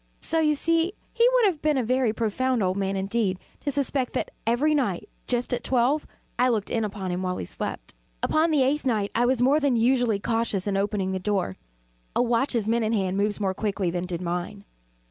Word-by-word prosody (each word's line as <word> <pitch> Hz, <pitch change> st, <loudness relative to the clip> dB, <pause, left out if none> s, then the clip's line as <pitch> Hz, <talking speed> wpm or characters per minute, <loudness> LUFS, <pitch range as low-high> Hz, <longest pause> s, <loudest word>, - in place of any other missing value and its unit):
So 325 Hz, -, 0 dB
you 305 Hz, -1 st, +3 dB
see 330 Hz, +5 st, +1 dB, 0.2 s
he 470 Hz, +1 st, +5 dB
would -, -, +4 dB
have 345 Hz, -7 st, +1 dB
been 305 Hz, -2 st, +2 dB
a 255 Hz, -, +1 dB
very 250 Hz, 0 st, +2 dB
profound 235 Hz, +2 st, 0 dB
old 185 Hz, 0 st, +1 dB
man, 195 Hz, 0 st, -1 dB
indeed, 195 Hz, 0 st, 0 dB, 0.2 s
to 290 Hz, -, -3 dB
suspect 275 Hz, -2 st, -1 dB
that -, -, -2 dB, 0.2 s
every 265 Hz, +7 st, +3 dB
night, 240 Hz, -, 0 dB, 0.2 s
just 245 Hz, 0 st, -1 dB
at 240 Hz, -1 st, -2 dB
twelve, 265 Hz, +4 st, +1 dB, 0.3 s
I 250 Hz, +1 st, +4 dB
looked 215 Hz, -4 st, -1 dB
in 225 Hz, -, 0 dB
upon 195 Hz, -3 st, -4 dB
him 180 Hz, +1 st, -2 dB
while 185 Hz, -1 st, -2 dB
he -, -, -4 dB
slept. -, -, -6 dB, 0.3 s
Upon 315 Hz, +2 st, +3 dB
the 300 Hz, -4 st, +3 dB
eighth 285 Hz, +3 st, +1 dB
night 215 Hz, -6 st, 0 dB
I 240 Hz, +1 st, +2 dB
was 250 Hz, -1 st, +2 dB
more 280 Hz, +4 st, +4 dB
than 280 Hz, -4 st, +2 dB
usually 240 Hz, -2 st, +3 dB
cautious 225 Hz, -3 st, -1 dB
in 200 Hz, -1 st, -1 dB
opening 195 Hz, -1 st, 0 dB
the 190 Hz, -, -2 dB
door. 190 Hz, -, -1 dB, 0.6 s
A -, -, +3 dB
watch's 235 Hz, -2 st, +1 dB
minute 225 Hz, 0 st, +1 dB
hand 190 Hz, -3 st, 0 dB
moves 205 Hz, +1 st, 0 dB
more 195 Hz, -2 st, 0 dB
quickly 195 Hz, -3 st, -1 dB
than 180 Hz, +1 st, -3 dB
did 175 Hz, 0 st, -4 dB
mine. 180 Hz, +3 st, -4 dB
230 Hz, 210 wpm, -25 LUFS, 195-265 Hz, 0.6 s, he